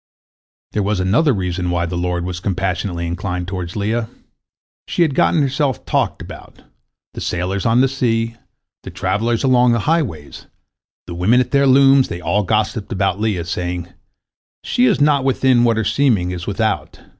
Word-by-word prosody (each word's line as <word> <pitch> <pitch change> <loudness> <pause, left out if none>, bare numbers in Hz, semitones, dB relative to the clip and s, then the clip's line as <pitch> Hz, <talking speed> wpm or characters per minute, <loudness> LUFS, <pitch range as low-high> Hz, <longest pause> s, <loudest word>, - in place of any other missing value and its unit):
There 105 - -1
was 100 0 -1
another 115 - +2
reason 90 -4 -2
why 85 -1 0
the 85 +1 -4
Lord 90 0 -2
was 90 -1 -4
compassionately 90 -2 -2
inclined 90 +1 -4
toward 90 -2 -5
Leah. 110 +2 -1 0.8
She 175 - +1
had 155 -4 0
gotten 150 +3 +2
herself 135 -1 -1
talked - - -1
about. - - -12 0.5
The - - -7
sailors 90 +4 -2
on 115 +2 +4
the 135 - +4
sea, 115 -3 -1 0.5
the - - -9
travellers 115 +2 -1
along 125 -2 +4
the 115 - 0
highways, 135 - -2 0.6
the 85 - -7
women 95 +9 +3
at 125 - -1
their 140 -1 +3
looms, 135 0 +5
they 85 - -6
all 105 +3 0
gossiped 105 +1 -1
about 95 0 0
Leah, 105 -6 -1
saying, 90 0 -4 0.7
"She 125 - +1
is - - +2
not 145 -2 +3
within 130 -2 +2
what 115 -2 +2
her 110 - +1
seeming 110 -11 +1
is 90 -1 -6
without. 110 +2 -2
105 Hz, 165 wpm, -18 LUFS, 90-125 Hz, 0.8 s, looms